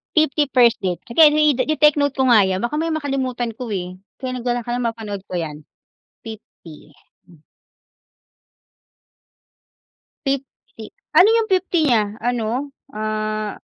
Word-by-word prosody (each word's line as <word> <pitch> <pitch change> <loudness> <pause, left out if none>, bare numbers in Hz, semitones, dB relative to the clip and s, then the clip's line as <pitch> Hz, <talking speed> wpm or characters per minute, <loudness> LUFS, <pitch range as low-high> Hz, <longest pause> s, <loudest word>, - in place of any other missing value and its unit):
Fifty 300 -1 +2
first 240 -3 +5
date, 180 -3 -2
sige 310 +7 +7
i 300 0 +4
ite-take 300 +2 +3
note 285 -1 +1
ko 265 - 0
nga 210 -5 +6
yan, 190 +2 -2
baka 295 +6 -2
mamaya 325 0 -1
makalimutan 265 -5 -2
ko 250 - -5
eh. 180 0 -5 0.2
Kaya 255 -1 -3
nagdala 245 0 -2
ka 240 - -7
ng 245 0 -1
mapanood 210 -4 -5
ko - - -8
'yan, 155 -3 -5 0.6
fifty. 220 -1 -8 0.2
50 155 -3 -14 0.3
Hmm. 170 -4 -20 2.9
Fifty, 275 -1 -1 0.2
50 220 -1 -10 0.2
ano 380 - +7
yung 450 -1 0
fifty 365 -2 +1
50 - - +2
niya? 220 -2 +4 0.2
Ano, 240 -3 -1 0.5
ah 215 0 -3
240 Hz, 150 wpm, -20 LUFS, 215-285 Hz, 2.9 s, sige